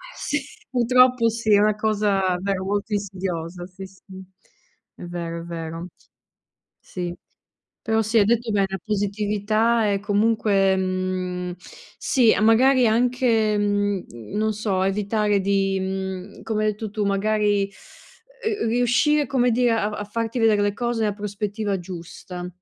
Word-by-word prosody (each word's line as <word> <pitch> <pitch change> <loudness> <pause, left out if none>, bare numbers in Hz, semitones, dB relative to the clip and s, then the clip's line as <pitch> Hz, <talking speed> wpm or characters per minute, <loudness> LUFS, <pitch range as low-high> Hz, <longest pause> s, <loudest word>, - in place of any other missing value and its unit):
s 295 - -2 0.3
purtroppo 250 -1 +4
sì, 225 -1 0
è 200 - +6
una 210 0 +3
cosa 210 -2 +1 0.2
davvero 195 0 -2
molto 205 +2 -2
insidiosa, 180 -3 -4
sì, 190 +1 -10
sì, 190 0 -22 0.9
è - - -11
vero, 170 -1 -5
è - - -9
vero. 165 0 -6 0.9
Sì, 175 -2 -5 0.7
però 225 -1 +1
sì, 220 +2 +2
hai 205 - +5
detto 235 +1 +1
bene, 200 -1 +2
la 190 - -3
positività 210 +2 +1
è 200 -1 0
comunque 205 -2 +2
mhmm, 185 -1 -2 0.4
sì, 240 -4 +3
magari 250 +4 +5
anche, 230 -2 +2
mhmm, 205 -2 0 0.3
non 215 +1 +1
so, 200 -3 -1
evitare 205 +1 +1
di, 195 0 +1
mhmm, 190 0 -5
come 215 -1 -1
hai 215 - +3
detto 210 0 -6
tu, 210 0 -2
magari, 205 0 +1 0.8
uhm, 425 -2 0
uhm, - - +1
riuscire 245 +5 +2
come 250 -1 +2
dire 245 0 +3
a 215 -2 0
a 210 0 -5
farti 230 +3 -3
vedere 215 -2 +4
le 205 0 0
cose 240 0 -1
nella 210 -2 0
prospettiva 205 0 -3
giusta. 180 0 -8
205 Hz, 145 wpm, -23 LUFS, 195-225 Hz, 0.9 s, è